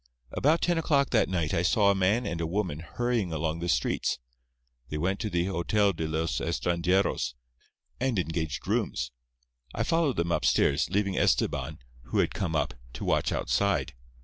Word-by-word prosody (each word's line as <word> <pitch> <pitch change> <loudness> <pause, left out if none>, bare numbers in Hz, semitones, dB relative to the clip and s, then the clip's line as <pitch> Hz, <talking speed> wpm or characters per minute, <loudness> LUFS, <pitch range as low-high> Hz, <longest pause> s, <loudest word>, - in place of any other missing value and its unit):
About 155 +4 +2
ten 175 -1 +2
o'clock 140 -4 +2
that 115 - +3
night 85 -5 -1
I 85 - +2
saw 100 +3 +4
a - - +3
man 100 +6 +2
and 85 0 -3
a 80 - -1
woman 90 -4 -2
hurrying 115 +2 -1
along 80 +1 -2
the 85 +1 -3
streets. 60 -5 +1 0.7
They 75 - -3
went 95 +5 0
to 110 - -2
the 85 -2 0
Hotel 100 +2 +1
de 80 -2 -3
los 80 -4 -1
Estranjeros, 85 0 0 0.6
and 125 -3 0
engaged 80 -4 -2
rooms. - - -1 0.6
I - - 0
followed 165 -6 +1
them 85 0 -1
upstairs, 70 -4 +2
leaving 100 +1 0
Estebán, 75 0 +1 0.3
who - - -3
had - - +2
come 85 -4 -2
up, 75 -3 0 0.2
to - - -6
watch - - +1
outside. 100 -10 0
90 Hz, 170 wpm, -28 LUFS, 80-105 Hz, 0.7 s, saw